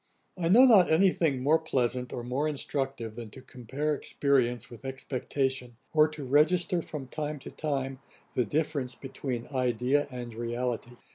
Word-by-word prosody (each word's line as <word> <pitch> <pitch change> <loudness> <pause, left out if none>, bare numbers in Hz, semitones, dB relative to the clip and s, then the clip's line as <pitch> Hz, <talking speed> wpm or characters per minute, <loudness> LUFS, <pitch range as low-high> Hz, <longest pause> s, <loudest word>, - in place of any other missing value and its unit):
'I 170 -2 -1
know 240 +8 +8
not 210 -8 +7
any 185 +4 +5
thing 140 -8 0
more 155 +4 +4
pleasant, 125 -5 -1
or 120 - -5
more 130 +5 -1
instructive, 135 -5 -3
than 115 -1 -8
to 130 - -11
compare 135 +4 -3
experience 135 -4 0
with 120 0 -13
expectation, 130 -1 -3 0.2
or 155 -1 +6
to 155 -3 -7
register 170 +6 +3
from 150 -4 -7
time 150 +2 -4
to 135 - -10
time 135 -3 -3 0.3
the 125 - +2
difference 140 +1 -1
between 130 -3 -5
idea 125 +2 +1
and 120 -3 -7
reality. 120 +1 -3
135 Hz, 155 wpm, -29 LUFS, 125-150 Hz, 0.3 s, know